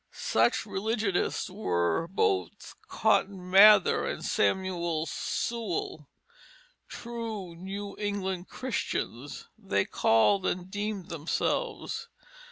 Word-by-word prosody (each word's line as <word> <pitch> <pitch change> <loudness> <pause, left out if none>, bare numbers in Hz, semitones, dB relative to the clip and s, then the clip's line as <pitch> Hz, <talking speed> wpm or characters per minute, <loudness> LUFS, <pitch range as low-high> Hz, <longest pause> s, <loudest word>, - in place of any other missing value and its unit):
Such 115 +1 +1
religionists 210 -1 -1
were 85 - 0
both 385 - -1
Cotton 195 -4 0
Mather 200 0 +7
and - - -4
Samuel 175 -4 0
Sewall, 180 - -3 0.8
"true 225 -7 -6
New 195 +3 -6
English 190 -3 -2
Christians" 145 - -4
they - - 0
called 185 - +3
and 180 +1 -3
deemed 205 -2 -4
themselves. 455 - -2
190 Hz, 85 wpm, -29 LUFS, 170-215 Hz, 0.8 s, Mather